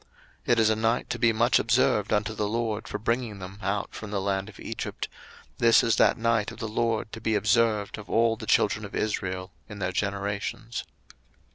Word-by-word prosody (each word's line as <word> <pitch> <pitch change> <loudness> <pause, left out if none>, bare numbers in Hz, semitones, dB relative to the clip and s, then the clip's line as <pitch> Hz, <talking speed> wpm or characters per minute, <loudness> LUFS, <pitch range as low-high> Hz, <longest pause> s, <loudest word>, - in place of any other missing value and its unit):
02:012:042 - - +2
It 115 - +2
is 110 -1 +4
a - - +2
night 115 +2 0
to - - -3
be 115 - +4
much 120 +2 +3
observed - - +2
unto 105 +1 +1
the 105 -1 -1
LORD 110 0 -2
for - - -3
bringing 115 0 -1
them 95 +1 -9
out 100 +1 -2
from 105 - -7
the 100 -1 -1
land 95 +1 -1
of 105 - -14
Egypt: 115 - -5 0.5
this 115 -1 +6
is 115 - +2
that - - +4
night 115 -2 +1
of - - -11
the 110 - -4
LORD 110 0 -1
to 115 - -8
be 110 0 +1
observed 105 0 +2
of 105 - -11
all 115 0 +3
the - - -9
children - - +2
of - - -7
Israel 95 -3 -2 0.2
in 105 - -8
their 95 -2 -2
generations. 100 +4 -3
110 Hz, 210 wpm, -27 LUFS, 100-115 Hz, 0.5 s, this